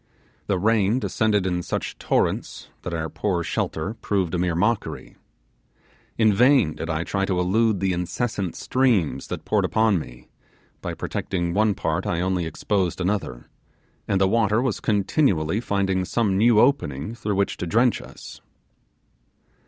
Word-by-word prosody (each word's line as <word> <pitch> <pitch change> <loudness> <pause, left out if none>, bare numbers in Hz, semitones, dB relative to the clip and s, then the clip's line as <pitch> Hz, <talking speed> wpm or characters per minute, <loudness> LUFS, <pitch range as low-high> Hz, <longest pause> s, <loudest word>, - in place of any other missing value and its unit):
The 100 - +1
rain 105 +2 +2
descended 110 -5 +1
in 90 -1 0
such - - -4
torrents - - -1
that 90 - -5
our 80 -1 -2
poor 85 +2 -2
shelter 80 +5 -2
proved 100 -6 -2
a 90 - 0
mere 90 -1 0
mockery. 105 +6 -1 1.0
In 110 -2 +4
vain 125 - +4
did 80 - -6
I 80 0 -1
try 95 +2 -2
to 95 -2 -1
elude 105 +3 +2
the 95 0 0
incessant 95 +2 -2
streams 105 - +1
that - - -6
poured - - +1
upon 110 -4 +2
me; - - -11 0.5
by - - -4
protecting 85 -2 -3
one 105 +1 +2
part 80 +3 -2
I 85 - 0
only 90 -2 0
exposed 95 +1 -1
another, 90 -10 -2 0.6
and 100 - +1
the 95 - +4
water 110 +1 +2
was 125 -3 -1
continually 100 - +1
finding 95 -4 0
some 100 0 0
new 110 +2 +4
opening 110 - +1
through 105 -3 -3
which 100 0 0
to 90 - -4
drench 115 +7 +2
us. - - -12
95 Hz, 150 wpm, -23 LUFS, 90-110 Hz, 1.0 s, In